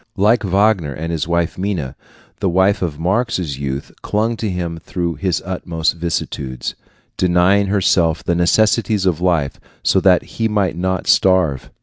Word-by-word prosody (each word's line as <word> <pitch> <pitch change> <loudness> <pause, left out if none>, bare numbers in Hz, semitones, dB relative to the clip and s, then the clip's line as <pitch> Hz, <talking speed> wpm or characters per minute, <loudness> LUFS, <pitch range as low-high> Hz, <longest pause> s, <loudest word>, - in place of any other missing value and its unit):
Like 110 +5 +3
Wagner 95 -5 +2
and 80 +2 -4
his 80 -2 -2 0.3
Minna, 90 -10 -3 0.4
the 100 - 0
wife 95 +3 +2
of 80 -5 -2
Marx's 90 - -1
youth 70 0 -4
clung 110 +3 0
to 110 - -2
him 85 -3 -4
through 85 +1 -3
his 90 -2 -2
utmost 85 -3 -1
vicissitudes, 75 -6 -4 0.4
denying 90 +3 +3
herself 85 -5 +2
the 85 - 0
necessities 105 +4 +2
of 90 -3 0
life 85 -6 0 0.2
so 95 - +3
that 90 -1 +4
he 115 - -2
might 100 -6 0
not 95 +1 -2
starve. 80 +1 +2
90 Hz, 145 wpm, -18 LUFS, 80-100 Hz, 0.4 s, that